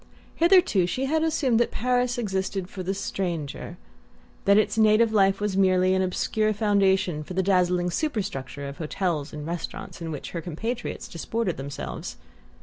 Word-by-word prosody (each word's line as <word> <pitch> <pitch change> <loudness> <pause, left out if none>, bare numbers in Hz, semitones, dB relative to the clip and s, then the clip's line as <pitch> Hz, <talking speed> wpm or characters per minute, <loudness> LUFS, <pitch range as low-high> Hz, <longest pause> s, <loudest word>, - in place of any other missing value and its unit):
Hitherto 340 - +4
she 260 +8 -1
had 315 +3 +1
assumed 275 -7 +2
that 240 - +2
Paris 245 0 0
existed 190 -4 -2
for 190 0 -7
the 190 +2 -2
stranger, 175 -7 -4 0.7
that 200 +1 +6
its 215 - +2
native 220 +1 +4
life 195 -2 +4
was 205 -2 -1
merely 185 -1 +3
an 190 - +2
obscure 215 +3 0
foundation 195 -6 +2
for 180 - -8
the 190 - +2
dazzling 180 -2 +2
superstructure 185 - -3
of 140 - -8
hotels 160 -2 -2
and 150 -1 -7
restaurants 170 +1 -6
in 165 - -4
which 150 -3 -6
her 170 - -4
compatriots 225 +10 -4
disported 185 +2 -3
themselves. 135 0 -6
190 Hz, 155 wpm, -25 LUFS, 175-220 Hz, 0.7 s, that